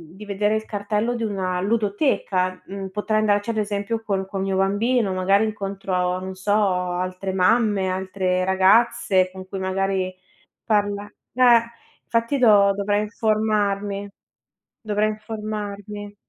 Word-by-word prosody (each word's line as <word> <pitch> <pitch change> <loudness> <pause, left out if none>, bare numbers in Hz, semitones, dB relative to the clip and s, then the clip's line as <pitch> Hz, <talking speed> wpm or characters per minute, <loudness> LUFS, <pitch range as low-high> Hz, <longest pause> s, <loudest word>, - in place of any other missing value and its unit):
di 210 - -10
vedere 205 +1 0
il 220 - -2
cartello 210 +3 -1
di 230 - -3
una 185 -4 -2
ludoteca. 200 -3 0
Mhmm, 195 0 -6
potrei 210 +2 -1
andarci 205 +1 +1
ad 225 - -2
esempio 210 +2 -2
col 195 -3 -2
col 195 -1 -4
mio 195 -1 -1
bambino, 205 +3 +1
magari 195 +3 +3
incontro 195 -3 -2
non 190 0 -6
so 190 +2 -3
altre 185 -1 -1
mamme, 195 0 +2
altre 185 -1 -1
ragazze 190 0 +3
con 185 0 -10
cui 195 - -6
magari 190 0 -1 0.5
parla 205 -2 0 0.3
eh 240 -2 +6 0.5
fatti 230 +4 0
do 205 -4 +6
dovrei 205 +1 0
informarmi, 205 -2 -1 0.7
dovrei 215 -1 0
informarmi. 210 -1 -6
205 Hz, 130 wpm, -23 LUFS, 190-215 Hz, 0.7 s, eh